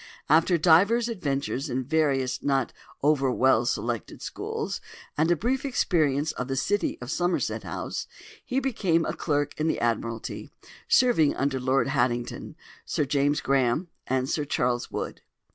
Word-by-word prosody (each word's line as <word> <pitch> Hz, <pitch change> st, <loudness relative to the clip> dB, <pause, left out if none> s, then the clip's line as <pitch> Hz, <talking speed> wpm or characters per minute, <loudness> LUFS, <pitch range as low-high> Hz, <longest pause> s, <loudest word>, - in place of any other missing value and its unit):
After 165 Hz, +3 st, +4 dB
divers 195 Hz, +9 st, +4 dB
adventures 140 Hz, -, -2 dB
in 130 Hz, +1 st, -1 dB
various 135 Hz, -3 st, +1 dB
not 135 Hz, -3 st, 0 dB, 0.3 s
over 140 Hz, -3 st, +3 dB
well 125 Hz, -1 st, +3 dB
selected 120 Hz, -3 st, -2 dB
schools, -, -, -4 dB, 0.3 s
and 160 Hz, +2 st, +2 dB
a 175 Hz, -, +4 dB
brief 250 Hz, -, -1 dB
experience 155 Hz, -, +1 dB
of 125 Hz, -, -5 dB
the 135 Hz, -, -2 dB
City 205 Hz, +10 st, 0 dB
and -, -, -11 dB
of 125 Hz, -, -5 dB
Somerset 175 Hz, +1 st, 0 dB
House, -, -, -5 dB, 0.4 s
he 260 Hz, +1 st, -1 dB
became 190 Hz, -11 st, +1 dB
a 155 Hz, -, -2 dB
clerk 145 Hz, -2 st, -1 dB
in 155 Hz, -, +1 dB
the -, -, 0 dB
Admiralty, 115 Hz, -1 st, -2 dB, 0.4 s
serving 235 Hz, -, +4 dB
under 135 Hz, -1 st, 0 dB
Lord 130 Hz, +2 st, +1 dB
Haddington, 120 Hz, -4 st, -1 dB, 0.3 s
Sir 150 Hz, -, -1 dB
James 145 Hz, +1 st, +1 dB
Graham, 135 Hz, +5 st, +1 dB, 0.2 s
and 130 Hz, 0 st, 0 dB
Sir 150 Hz, -, -1 dB
Charles 125 Hz, -3 st, -1 dB
Wood. -, -, -5 dB
145 Hz, 150 wpm, -26 LUFS, 130-165 Hz, 0.4 s, After